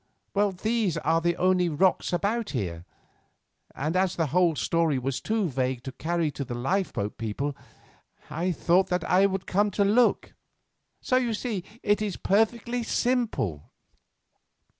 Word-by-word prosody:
Well, 205 0 +2
these 215 -1 -1
are 165 +2 +1
the 170 0 +1
only 185 -1 +2
rocks 180 +5 +1
about 205 +6 -1
here; 85 -5 -4 0.9
and 155 +5 -2
as 185 -1 +1
the 165 - +1
whole 175 -3 +3
story 165 -2 +1
was 130 +1 -2
too 220 -3 0
vague 130 -3 -2
to 135 - -5
carry 165 +3 -1
to 140 - -5
the 125 -2 -6
lifeboat 125 - -2
people 125 +6 -3 0.7
I 175 +4 -1
thought 175 +3 +2
that 180 -2 -1
I 190 +2 +5
would 190 -1 -3
come 205 +2 +2
to 200 - +4
look. 225 +4 +2 0.7
So 255 - +2
you 240 -3 0
see 210 -5 -3 0.2
it 205 +1 +2
is 205 -3 -2
perfectly 235 +4 +1
simple." 230 - -1
180 Hz, 150 wpm, -26 LUFS, 145-205 Hz, 0.9 s, I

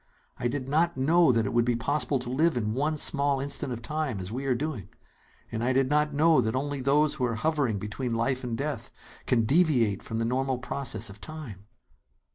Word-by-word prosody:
I 120 - 0
did 130 +1 -3
not 165 +4 +1
know 160 +3 +4
that 115 -2 +1
it 100 - -3
would 120 0 +3
be 120 0 +1
possible 140 +4 +1
to 125 -1 -5
live 155 +2 +2
in 105 -2 -1
one 150 +5 0
small 140 -2 +2
instant 140 -1 -1
of 120 -1 -5
time, 150 -5 -2
as 95 +2 -5
we 135 +4 -4
are 130 - +2
doing. 125 - -4 0.6
And 115 0 -3
I 130 +2 +2
did 135 +1 +1
not 150 0 +2
know 155 +2 +4
that 110 +3 -1
only 140 +1 -2
those 145 +3 +3
who 130 -5 -1
are 115 -2 -1
hovering 135 -3 0
between 115 +4 -4
life 130 +3 0
and 120 -2 -3
death 140 -4 -4 0.4
can 115 -3 +2
deviate 125 - +3
from 115 - -5
the 115 - 0
normal 130 +2 0
process 125 -4 -3
of 100 +2 -14
time!" 125 - -9
130 Hz, 215 wpm, -27 LUFS, 115-150 Hz, 0.6 s, know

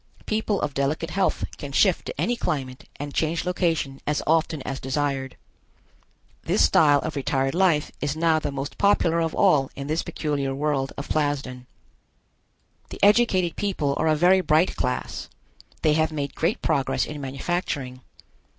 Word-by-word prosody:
People 215 -2 0
of 145 - -2
delicate 150 +5 -1
health 195 0 0
can 145 - -6
shift 185 +5 +2
to - - -6
any 245 - +1
climate 130 - -4
and 145 0 -6
change 165 +2 0
location 165 -7 -1
as 150 0 0
often 160 -2 +1
as 135 -1 -4
desired. 135 0 -2 1.0
This 80 - +2
style 145 - +5
of 160 - -4
retired 135 -1 0
life 170 -4 +2
is 145 0 -1
now 160 -1 +3
the 145 - -3
most 140 +1 -6
popular 175 -5 +3
of 165 -1 -1
all 135 -3 +3
in 140 - -6
this 155 +3 -1
peculiar 140 -3 -2
world 140 -2 -1
of 140 - -5
Plasden. 135 -4 -2 1.2
The - - -8
educated 200 -5 +4
people 170 -9 -1
are 160 - +1
a 155 - +4
very 180 +4 +4
bright 160 +1 +2
class; 125 0 -3 0.5
they 155 - +4
have 155 +1 +1
made 145 -2 -3
great 170 +6 -1
progress 135 - +1
in 150 -1 -7
manufacturing. 135 -2 -3
150 Hz, 160 wpm, -24 LUFS, 140-170 Hz, 1.2 s, style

